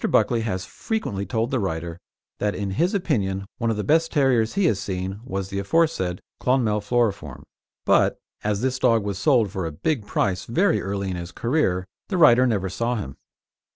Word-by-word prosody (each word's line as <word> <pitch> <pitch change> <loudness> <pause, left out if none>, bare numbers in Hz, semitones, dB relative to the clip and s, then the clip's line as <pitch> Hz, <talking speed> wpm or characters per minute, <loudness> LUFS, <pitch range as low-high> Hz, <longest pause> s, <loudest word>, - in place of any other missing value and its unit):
Buckley 120 -2 +3
has 100 -4 -3
frequently 105 - -3
told 115 0 -1
the 130 - +1
writer 85 -3 -3 0.4
that 105 0 0
in 100 -2 -3
his 175 - +1
opinion 100 - -1
one 115 -1 0
of 110 - 0
the 105 - -1
best 165 +5 +2
terriers 130 -6 +2
he 200 -2 +2
has 105 - +2
seen 95 +1 -4
was 95 -5 -4
the 100 - -3
aforesaid 100 - +1 0.2
Clonmel 115 -5 +1
Floriform, 100 - -1 0.4
but, - - +3 0.3
as 105 -1 0
this 130 0 0
dog 115 -4 +3
was 100 -1 -3
sold 120 - +3
for 95 -3 -3
a - - -4
big 105 - -2
price 95 -2 0
very 185 +13 +2
early 100 -1 -3
in 90 - -3
his 85 0 -6
career, 115 - 0 0.2
the 190 - -2
writer 130 -6 +6
never 100 -5 0
saw 115 +6 -1
him. 75 - -5
105 Hz, 190 wpm, -24 LUFS, 95-130 Hz, 0.4 s, writer